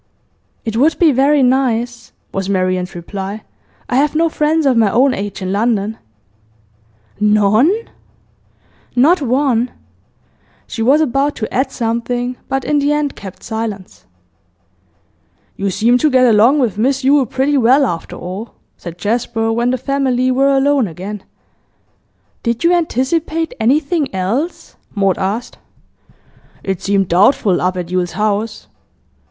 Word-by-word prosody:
'It 225 Hz, -1 st, -3 dB
would 305 Hz, +6 st, +3 dB
be 330 Hz, -3 st, +4 dB
very 275 Hz, +2 st, +3 dB
nice,' 245 Hz, -2 st, 0 dB, 0.2 s
was 195 Hz, 0 st, -3 dB
Marian's 185 Hz, -1 st, -1 dB
reply. 195 Hz, +4 st, -6 dB, 0.4 s
'I 250 Hz, -, 0 dB
have 295 Hz, +2 st, +1 dB
no 330 Hz, +1 st, +2 dB
friends 310 Hz, 0 st, 0 dB
of 265 Hz, -2 st, +3 dB
my 225 Hz, -3 st, +3 dB
own 255 Hz, +6 st, +3 dB
age 200 Hz, 0 st, -5 dB
in 185 Hz, -, -2 dB
London.' 215 Hz, 0 st, 0 dB, 1.2 s
'None?' 210 Hz, -, +3 dB, 1.2 s
'Not 300 Hz, +8 st, +4 dB
one!' 255 Hz, -2 st, +1 dB, 1.0 s
She 225 Hz, -, -6 dB
was 275 Hz, +7 st, +4 dB
about 280 Hz, 0 st, 0 dB
to 220 Hz, -, -5 dB
add 265 Hz, +1 st, 0 dB
something, 245 Hz, +1 st, -2 dB
but 270 Hz, -1 st, -2 dB
in 295 Hz, -1 st, +1 dB
the 285 Hz, +1 st, +1 dB
end 295 Hz, -1 st, -1 dB
kept 190 Hz, -2 st, -10 dB
silence. 220 Hz, -4 st, -6 dB, 1.5 s
'You 200 Hz, 0 st, -2 dB
seem 230 Hz, +6 st, +2 dB
to 305 Hz, -, +3 dB
get 255 Hz, -2 st, +4 dB
along 235 Hz, +4 st, +5 dB
with 230 Hz, -7 st, 0 dB
Miss 270 Hz, +3 st, +1 dB
Yule 275 Hz, -1 st, +3 dB
pretty 270 Hz, +5 st, 0 dB
well, 260 Hz, +4 st, +4 dB
after 170 Hz, -8 st, -4 dB
all,' 190 Hz, +6 st, -7 dB, 0.2 s
said 170 Hz, -1 st, -9 dB
Jasper, 225 Hz, +3 st, -1 dB
when 235 Hz, +2 st, 0 dB
the 255 Hz, -, 0 dB
family 260 Hz, -1 st, 0 dB
were 270 Hz, +2 st, +2 dB
alone 275 Hz, -3 st, +2 dB
again. 190 Hz, +4 st, -7 dB, 1.2 s
'Did 235 Hz, +3 st, -2 dB
you 340 Hz, +1 st, +4 dB
anticipate 325 Hz, +1 st, -1 dB
anything 285 Hz, +5 st, +1 dB
else?' 230 Hz, -, -3 dB, 0.2 s
Maud 195 Hz, -3 st, +1 dB
asked. 205 Hz, +5 st, -3 dB, 1.0 s
'It 190 Hz, -2 st, -3 dB
seemed 195 Hz, -1 st, +1 dB
doubtful, 190 Hz, +1 st, +3 dB
up 185 Hz, 0 st, 0 dB
at 175 Hz, -1 st, -5 dB
Yule's 180 Hz, -2 st, -1 dB
house. 210 Hz, +1 st, -2 dB
240 Hz, 135 wpm, -16 LUFS, 205-275 Hz, 1.5 s, along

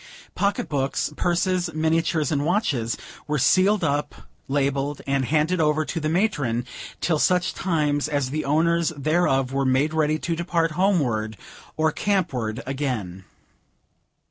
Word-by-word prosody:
Pocket 200 Hz, 0 st, 0 dB
books, 140 Hz, +1 st, -1 dB
purses, 180 Hz, +1 st, 0 dB
miniatures, 160 Hz, -1 st, +1 dB
and 145 Hz, -2 st, +1 dB
watches, 150 Hz, -, 0 dB, 0.3 s
were 150 Hz, 0 st, 0 dB
sealed 185 Hz, +9 st, +3 dB
up, 145 Hz, -1 st, -1 dB, 0.3 s
labelled, 140 Hz, +1 st, -1 dB
and 135 Hz, -1 st, 0 dB
handed 160 Hz, +5 st, +1 dB
over 155 Hz, 0 st, +2 dB
to 155 Hz, +4 st, -3 dB
the 155 Hz, -1 st, -1 dB
matron, 145 Hz, -, 0 dB, 0.4 s
till 160 Hz, -4 st, +1 dB
such 180 Hz, +2 st, +2 dB
times 150 Hz, -5 st, 0 dB
as 140 Hz, -3 st, -1 dB
the 155 Hz, +1 st, -2 dB
owners 165 Hz, +3 st, +2 dB
thereof 135 Hz, -3 st, +1 dB
were 135 Hz, 0 st, +1 dB, 0.3 s
ready 155 Hz, -1 st, +1 dB
to 165 Hz, +1 st, -2 dB
depart 170 Hz, -1 st, 0 dB
homeward 135 Hz, -, 0 dB, 0.4 s
or 155 Hz, 0 st, +2 dB
campward 140 Hz, -, -1 dB
again. 125 Hz, -10 st, -3 dB
150 Hz, 130 wpm, -24 LUFS, 135-170 Hz, 0.4 s, sealed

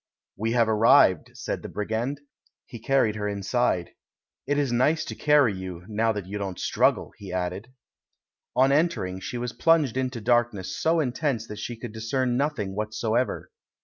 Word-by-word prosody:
"We 115 Hz, +2 st, -1 dB
have 115 Hz, -2 st, +3 dB
arrived," 105 Hz, -5 st, +5 dB
said -, -, -4 dB
the -, -, -7 dB
brigand; 115 Hz, +7 st, -3 dB, 0.4 s
he 120 Hz, -, -10 dB
car 135 Hz, +4 st, +2 dB
ried 110 Hz, -, 0 dB
her 105 Hz, -1 st, -2 dB
inside. 100 Hz, -2 st, 0 dB, 0.6 s
"It 145 Hz, +1 st, +1 dB
is 140 Hz, -4 st, +1 dB
nice 150 Hz, +6 st, +2 dB
to -, -, -5 dB
carry 150 Hz, -7 st, +3 dB
you, 90 Hz, -2 st, -7 dB
now 110 Hz, +1 st, +1 dB
that 105 Hz, -3 st, -5 dB
you 100 Hz, +2 st, -5 dB
don't 95 Hz, -2 st, -4 dB
struggle," -, -, +1 dB
he 100 Hz, -2 st, -8 dB
added. 90 Hz, +6 st, -3 dB, 0.8 s
On 130 Hz, +2 st, +4 dB
entering, 140 Hz, -, +1 dB
she 120 Hz, -, -5 dB
was 120 Hz, 0 st, -4 dB
plunged 155 Hz, -7 st, +3 dB
into 130 Hz, -2 st, -2 dB
darkness 120 Hz, -4 st, 0 dB
so 165 Hz, +1 st, +2 dB
intense 125 Hz, -3 st, -1 dB
that 105 Hz, -, -7 dB
she 120 Hz, +2 st, -5 dB
could 115 Hz, 0 st, -7 dB
discern 120 Hz, +3 st, -1 dB
nothing 125 Hz, -9 st, -1 dB
whatever. 110 Hz, +3 st, -1 dB
115 Hz, 170 wpm, -26 LUFS, 105-130 Hz, 0.8 s, arrived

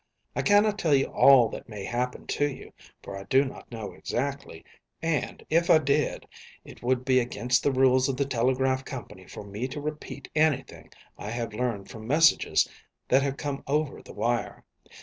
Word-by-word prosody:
I -, -, 0 dB
cannot 205 Hz, 0 st, +3 dB
tell 155 Hz, -6 st, +3 dB
you 135 Hz, -, +3 dB
all 135 Hz, -4 st, +7 dB
that -, -, -9 dB
may 105 Hz, -3 st, -7 dB
happen 125 Hz, +4 st, -3 dB
to 145 Hz, 0 st, 0 dB
you, -, -, -11 dB, 0.3 s
for 100 Hz, -, -7 dB
I 95 Hz, 0 st, -8 dB
do 135 Hz, +7 st, +3 dB
not 130 Hz, -, -9 dB
know 110 Hz, -3 st, -6 dB
exactly, 140 Hz, -10 st, -4 dB, 0.3 s
and, 165 Hz, -2 st, -2 dB
if 170 Hz, +3 st, +2 dB
I 165 Hz, -, +8 dB
did, 145 Hz, -1 st, 0 dB, 0.4 s
it -, -, -13 dB
would 125 Hz, +1 st, 0 dB
be 130 Hz, -1 st, +4 dB
against 125 Hz, +1 st, 0 dB
the 140 Hz, -, +2 dB
rules 130 Hz, 0 st, +3 dB
of 130 Hz, -, -2 dB
the 140 Hz, -, +1 dB
telegraph 130 Hz, +1 st, +1 dB
company -, -, -9 dB
for -, -, -9 dB
me 105 Hz, +5 st, -4 dB
to 140 Hz, +3 st, -6 dB
repeat 150 Hz, +1 st, -6 dB
anything 155 Hz, -3 st, 0 dB, 0.3 s
I 105 Hz, -, -6 dB
have 115 Hz, -1 st, -4 dB
learned 110 Hz, -4 st, -3 dB
from 110 Hz, -1 st, -9 dB
messages 160 Hz, +5 st, +4 dB, 0.4 s
that 130 Hz, +2 st, +5 dB
have 140 Hz, 0 st, -2 dB
come 140 Hz, -1 st, -4 dB
over 150 Hz, 0 st, -1 dB
the -, -, -13 dB
wire. 120 Hz, 0 st, -2 dB
130 Hz, 185 wpm, -27 LUFS, 120-145 Hz, 0.4 s, I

